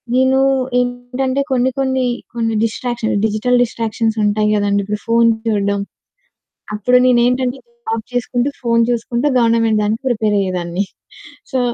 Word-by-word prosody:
నేను 260 +1 +3 0.4
ఏంటంటే 250 +2 -2
కొన్ని, 255 0 +2
కొన్ని 260 -1 0 0.3
కొన్ని 230 -1 -1
డిస్ట్రాక్షన్స్, 235 -2 -2
డిజిటల్ 235 +3 +1
డిస్ట్రాక్షన్స్ 225 -1 -2
ఉంటాయి 210 +1 +1
కదండీ! 205 -1 +1
ఇప్పుడు 210 0 -3
ఫోను 230 0 +4 0.2
చూడడం. 200 -2 0 0.9
అప్పుడు 250 +4 +3
నేనేంటంటే 250 +1 +2 0.3
జాబ్ 225 -1 -2
చేసుకుంటూ, 245 +2 0
ఫోను 230 -2 +2
చూసుకుంటూ 240 +3 -1
గవర్నమెంట్ 230 -2 +2
దానికి 220 +5 -1
ప్రిపేరయ్యేదాన్ని. 195 -5 0 0.7
సో, 260 - 0
230 Hz, 120 wpm, -17 LUFS, 215-250 Hz, 0.9 s, ఫోను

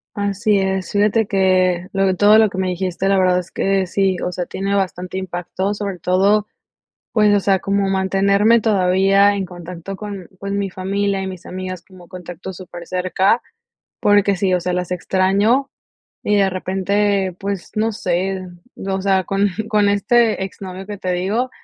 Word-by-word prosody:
Así 205 0 +1
es, 190 -1 -1
fíjate 210 +2 +2
que, 185 -2 +2
lo 195 0 +1
que 190 - +2
todo 205 +3 +5
lo 220 -1 +6
que 190 - -6
me 185 - 0
dijiste, 185 +1 -2
la 195 - +3
verdad 185 -1 +3
es 180 0 -8
que 195 -1 0
sí, 190 0 +1
o 180 - -1
sea, 175 0 -3
tiene 195 +1 -2
bastante 185 -2 -2
impacto, 190 +2 -3
sobre 200 -3 -4
todo, 195 +5 +2 0.7
pues, 210 -2 +4
o 200 - +2
sea, 195 -1 +2
como 200 0 0
mantenerme 200 +4 +3
todavía 195 0 +3
en 195 -1 -2
contacto 180 +2 -8
con, 200 -4 -7
pues, 200 0 -4
mi 200 -1 -1
familia 195 +1 -1
y 190 - -3
mis 185 -1 -8
amigas 185 -1 -6
como 180 -2 -16
contacto 180 0 -8
súper 175 -2 -10
cerca, 185 +5 +1 0.6
porque 205 -1 +4
sí, 190 -1 +1
o 180 - +1
sea, 180 - -1
las 180 0 -2
extraño 195 +9 +1 0.5
y 210 - +1
de 195 -1 +3
repente, 190 +1 0
pues, 195 -2 -4
no 220 +1 0
sé, 185 0 -2 0.3
o 190 0 -3
sea, 190 -1 +2
con 195 +2 +1 0.2
con 210 -1 +3
este 215 +1 +2
ex 190 +1 -8
novio 190 0 -7
que 205 0 -7
te 185 -1 -2
digo, 205 +8 -1
195 Hz, 175 wpm, -19 LUFS, 185-200 Hz, 0.7 s, lo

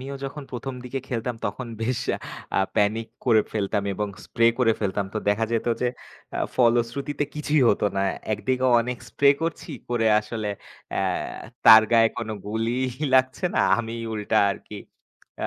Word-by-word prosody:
আমিও 135 +2 -6
যখন 140 +2 -6
১ম 130 +2 -5
দিকে 135 +2 -4
খেলতাম 120 -1 -3
তখন 130 - -5 0.2
বেশ 125 +1 0 0.6
আ - - +4 0.2
প্যানিক 110 +2 +1 0.2
করে 110 -4 +5
ফেলতাম 100 -1 -1
এবং 105 +1 -2 0.2
স্প্রে 115 0 +2
করে 115 -3 +4
ফেলতাম। 100 -1 -1
তো 110 - 0
দেখা 105 +2 +2
যেত 115 - 0
যে 125 - +2 0.5
আ - - -3 0.2
ফলশ্রুতিতে 120 +4 +1
কিছুই 150 -1 +1
হত - - +2
না। 95 - +1 0.3
একদিকেও 130 +4 0
অনেক 125 0 -3
স্প্রে 140 0 +4
করছি। 165 -1 -3 0.2
করে 120 -2 +1
আসলে 105 0 -5 0.4
এ্যা - - 0 0.6
তার 110 -1 +10
গায়ে 115 -1 +6
কোনো 110 -1 -4
গুলি 115 +3 -1 0.4
লাগছে 130 +6 +2
না - - +3 0.2
আমি 115 -1 -4 0.2
উল্টা 105 +1 -1
আর - - -3
কি 105 - -7 0.7
আ - - 0
115 Hz, 165 wpm, -24 LUFS, 110-130 Hz, 0.7 s, তার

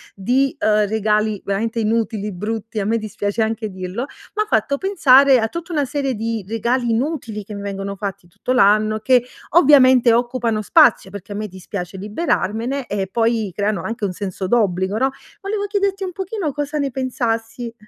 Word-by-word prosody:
di, 255 +7 +1
uhm, 210 -8 +2
regali 215 -1 0
veramente 220 +4 -2
inutili, 215 -1 -1
brutti. 215 +3 -4
A 195 - -1
me 230 +2 +1
dispiace 210 0 -3
anche 220 0 -1
dirlo, 185 +5 -5 0.3
m'ha 425 0 +1
fatto 220 +6 +1
pensare 275 -9 +5
a 220 0 0
tutta 340 +3 -6
una 295 -2 +1
serie 275 -1 -2
di 225 -2 -3
regali 235 +2 0
inutili 230 -4 -2
che 210 - -9
mi 200 - -6
vengono 200 0 -5
fatti 195 -3 -5
tutto 255 +8 -3
l'anno, 215 -1 +4
che, 250 +1 +3 0.3
ovviamente, 260 -6 +6
occupano 240 -2 0
spazio, 190 -1 +4
perché 205 0 -8
a - - -7
me 210 0 -3
dispiace 185 0 -7
liberarmene, 230 - -2
e 195 -2 -2
poi, 225 -3 +1
creano 205 -1 -1
anche 225 -2 -3
un 185 - -2
senso 190 0 -4
d'obbligo, 190 -3 +1
no, 265 +4 +2 0.3
volevo 405 +1 -2
chiederti 395 -1 -1
un 365 - -6
pochino 380 -4 -3
cosa 295 +1 -3
ne 280 -2 0
pensassi. 235 -2 -3
225 Hz, 170 wpm, -20 LUFS, 205-265 Hz, 0.3 s, ovviamente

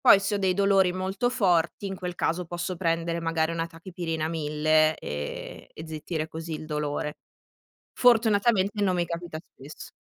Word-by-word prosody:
Poi 240 -6 +7
se 200 +1 0
ho - - -2
dei 190 -2 +2
dolori 195 -2 +4
molto 190 +6 -1
forti, 185 -5 +1
in 195 -1 -4
quel 180 -1 -5
caso 175 +1 -1
posso 175 +1 -4
prendere 165 0 0
magari 165 -1 0
una 165 0 -2
tachipirina 165 -2 -4
1000, 155 0 +2
ehm, 75 0 -6
e 160 - -8
zittire 160 0 -4
così 160 +1 -6
il 155 - -5
dolore. 150 -1 -2 0.8
Fortunatamente 215 -4 +3
non 185 -2 +2
mi 175 -1 +1
capita 170 -1 -5
spesso. 150 -3 -12
170 Hz, 160 wpm, -27 LUFS, 160-190 Hz, 0.8 s, Poi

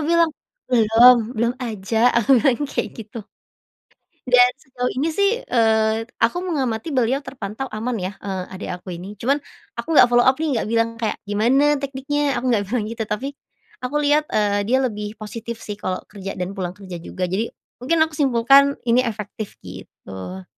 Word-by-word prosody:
bilang, 335 -1 +4 0.4
"Belum, 235 +2 +7 0.2
belum 235 +2 +1
aja." 225 +1 +1
Aku 240 +3 +5
bilang 265 +4 +2
kayak - - -3
gitu. 220 +2 -10 1.1
Dan 250 0 +7 0.2
sejauh 250 -1 -3
ini, 295 +5 +1
sih, 400 +3 +3
eee, 220 -1 +2 0.2
aku 235 +10 +2
mengamati 275 -5 -2
beliau 255 +3 +2
terpantau 235 -2 -6
aman, 230 +3 -2
ya, 185 +2 -3
eee, 190 -2 -3
adik 190 - -7
aku 180 - -8
ini. 190 +4 -8
Cuman, 275 +4 +2 0.4
aku 330 - -3
enggak - - +9
follow 240 0 +4
up, 260 0 +4
nih, 315 -2 0
enggak 220 - -2
bilang 230 0 +1
kayak, 220 -2 -1
"Gimana 260 +8 +3
tekniknya?" 280 0 -1
Aku 255 - -2
enggak 205 -3 +1
bilang 235 -4 0
gitu. 230 -1 -3
Tapi, 210 +6 -2 0.5
aku 255 +4 -3
lihat, 300 +1 +3
eee, 205 -1 0
dia 260 +2 +3
lebih 210 -2 -4
positif, 225 +1 -7
sih, 210 - -5
kalau 185 -2 -2 0.2
kerja 195 -1 -6
dan 180 +1 -3
pulang 185 -2 -5
kerja 185 -4 -8
juga. 180 +2 -4
Jadi, 190 +6 -1 0.3
mungkin 320 +7 +1
aku 320 - -8
simpulkan 275 +1 +4
ini 240 +1 +4
efektif 215 -3 -5
gitu. 95 0 -9
230 Hz, 170 wpm, -21 LUFS, 205-265 Hz, 1.1 s, enggak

